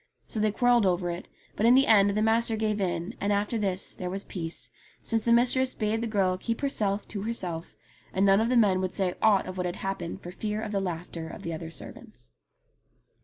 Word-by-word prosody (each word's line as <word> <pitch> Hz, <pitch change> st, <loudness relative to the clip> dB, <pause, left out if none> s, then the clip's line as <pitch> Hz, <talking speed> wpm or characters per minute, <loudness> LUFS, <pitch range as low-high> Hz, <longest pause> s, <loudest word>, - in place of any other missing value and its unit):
So 220 Hz, -, -4 dB
they 215 Hz, 0 st, +2 dB
quarrelled 240 Hz, -1 st, +3 dB
over 175 Hz, -1 st, 0 dB
it; 170 Hz, +1 st, -6 dB, 0.3 s
but 220 Hz, -, +2 dB
in 245 Hz, -, +7 dB
the 270 Hz, +1 st, +5 dB
end 205 Hz, -2 st, +6 dB
the 215 Hz, -, +2 dB
master 225 Hz, +1 st, +2 dB
gave 215 Hz, -1 st, -1 dB
in, 175 Hz, -2 st, -2 dB
and 200 Hz, -, +1 dB
after 205 Hz, +3 st, 0 dB
this 190 Hz, -2 st, 0 dB
there 180 Hz, -, -5 dB
was 195 Hz, +2 st, -4 dB
peace, 165 Hz, -3 st, -3 dB, 0.3 s
since 225 Hz, -2 st, -1 dB
the 235 Hz, -, +1 dB
mistress 255 Hz, +2 st, +4 dB
bade 220 Hz, +1 st, -1 dB
the 235 Hz, -, -1 dB
girl 190 Hz, -4 st, +1 dB
keep 230 Hz, +3 st, -3 dB
herself 210 Hz, -8 st, -1 dB
to 205 Hz, -, -4 dB
herself, 180 Hz, -7 st, -4 dB, 0.4 s
and 190 Hz, +1 st, +2 dB
none 195 Hz, +1 st, +5 dB
of 230 Hz, -, +1 dB
the 250 Hz, -, +3 dB
men 195 Hz, -5 st, +4 dB
would 185 Hz, -1 st, -2 dB
say 185 Hz, -2 st, 0 dB
ought 205 Hz, -3 st, +4 dB
of 185 Hz, 0 st, -7 dB
what 180 Hz, -1 st, -1 dB
had 175 Hz, -, -4 dB
happened 195 Hz, -3 st, -4 dB
for 175 Hz, -, -7 dB
fear 210 Hz, +3 st, -3 dB
of 220 Hz, -1 st, -4 dB
the 200 Hz, -2 st, 0 dB
laughter 165 Hz, -2 st, -5 dB
of -, -, -9 dB
the 165 Hz, -, -3 dB
other 160 Hz, 0 st, -6 dB
servants. 155 Hz, -, -10 dB
200 Hz, 225 wpm, -28 LUFS, 180-220 Hz, 0.4 s, in